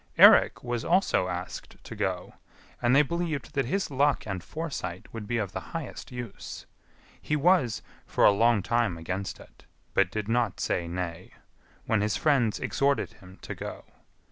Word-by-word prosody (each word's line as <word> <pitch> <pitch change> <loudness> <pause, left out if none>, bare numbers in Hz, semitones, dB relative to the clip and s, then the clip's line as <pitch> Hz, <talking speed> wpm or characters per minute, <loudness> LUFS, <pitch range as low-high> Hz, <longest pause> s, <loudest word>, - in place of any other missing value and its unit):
Eirik - - +7
was 120 -1 -2
also 175 - +2
asked 90 0 -6
to - - -8
go, - - -2 0.5
and 120 +1 +4
they 150 - +7
believed 165 -1 -3
that 135 -2 +1
his 195 +2 -1
luck 140 +2 +2
and 95 -4 -4
foresight 150 - -5
would 110 -2 -6
be 120 - 0
of 105 -4 -2
the - - -3 0.2
highest - - -7
use. 120 -4 -7 0.6
He 150 - 0
was 150 - +3 0.2
[for - - +3
a - - +8
long 115 0 +3
time 115 -6 +1
against 95 +4 -4
it, - - -17 0.3
but 95 -1 +3
did 105 0 -3
not 115 -4 +1
say 85 -1 -1
nay], 85 -1 -5 0.5
when 110 -2 +2
his 105 0 +1
friends 135 -9 +2
exhorted 140 0 0
him 95 0 -15
to - - -5
go. - - -7
115 Hz, 170 wpm, -28 LUFS, 95-140 Hz, 0.6 s, a